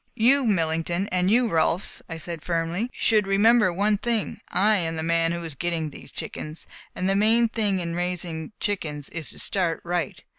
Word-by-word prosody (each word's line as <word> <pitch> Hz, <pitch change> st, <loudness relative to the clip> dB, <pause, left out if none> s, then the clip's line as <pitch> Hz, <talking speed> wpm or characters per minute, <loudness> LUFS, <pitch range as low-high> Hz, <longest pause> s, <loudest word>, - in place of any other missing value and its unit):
"You, 260 Hz, +4 st, +4 dB
Millington, 170 Hz, 0 st, 0 dB
and 180 Hz, 0 st, +1 dB
you, 240 Hz, +3 st, +4 dB
Rolfs," 170 Hz, -1 st, 0 dB
I 165 Hz, -, -5 dB
said 165 Hz, 0 st, -6 dB
firmly, 170 Hz, +7 st, -1 dB
"should 215 Hz, -3 st, +2 dB
remember 210 Hz, +1 st, +4 dB
one 205 Hz, +3 st, +1 dB
thing: 230 Hz, -2 st, -1 dB
I 205 Hz, +4 st, +3 dB
am 165 Hz, -3 st, -1 dB
the 160 Hz, -, -3 dB
man 165 Hz, 0 st, +2 dB
who 170 Hz, 0 st, -3 dB
is 165 Hz, -2 st, -5 dB
getting 160 Hz, +1 st, -2 dB
these -, -, -12 dB
chickens, 155 Hz, +1 st, -7 dB, 0.3 s
and 185 Hz, -, -1 dB
the 195 Hz, -, +2 dB
main 225 Hz, +3 st, +4 dB
thing 210 Hz, -4 st, 0 dB
in 170 Hz, -1 st, -3 dB
raising 175 Hz, -2 st, -3 dB
chickens 150 Hz, -8 st, -2 dB
is 160 Hz, -6 st, -4 dB
to -, -, -5 dB
start 180 Hz, -5 st, -1 dB
right. 175 Hz, 0 st, -3 dB
180 Hz, 185 wpm, -25 LUFS, 165-210 Hz, 0.3 s, You